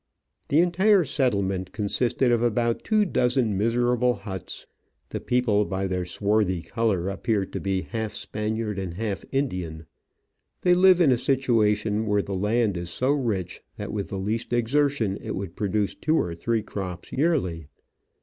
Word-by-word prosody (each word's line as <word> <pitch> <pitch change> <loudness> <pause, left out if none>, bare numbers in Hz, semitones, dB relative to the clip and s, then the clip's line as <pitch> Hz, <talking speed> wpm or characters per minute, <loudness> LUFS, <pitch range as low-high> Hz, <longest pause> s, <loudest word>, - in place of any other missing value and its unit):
The 150 +4 +5
entire 185 +3 +4
settlement 100 -9 0
consisted 120 +4 +1
of 120 -1 +2
about 120 0 +1
two 215 -1 +2
dozen 125 - +1
miserable 120 +3 +2
huts. 95 -3 -7 0.4
The - - -4
people 120 -4 +2
by 95 -1 -2
their 90 -1 -2
swarthy 100 -1 0
colour 110 -6 0
appeared 100 0 -1
to - - -2
be 95 -1 -1
half 110 -2 -4
Spaniard 105 -1 -3
and 90 -3 -5
half 105 -1 -3
Indian. 90 - -2 0.8
They 180 - +4
live 185 0 +6
in 150 -6 +5
a 125 - +2
situation 110 -5 +1
where 105 -1 +2
the 100 - -5
land 105 +1 +1
is 85 -1 -5
so 130 +10 0
rich 115 -11 -2 0.2
that - - -5
with 100 -2 -2
the 100 - -4
least 110 +5 -2
exertion 120 -3 +1
it - - -4
w^ould 95 -3 -5
produce 105 0 0
two 155 +1 0
or 85 - 0
three 110 +6 -1
crops 95 -4 -6
yearly. 125 - 0
110 Hz, 160 wpm, -25 LUFS, 95-125 Hz, 0.8 s, live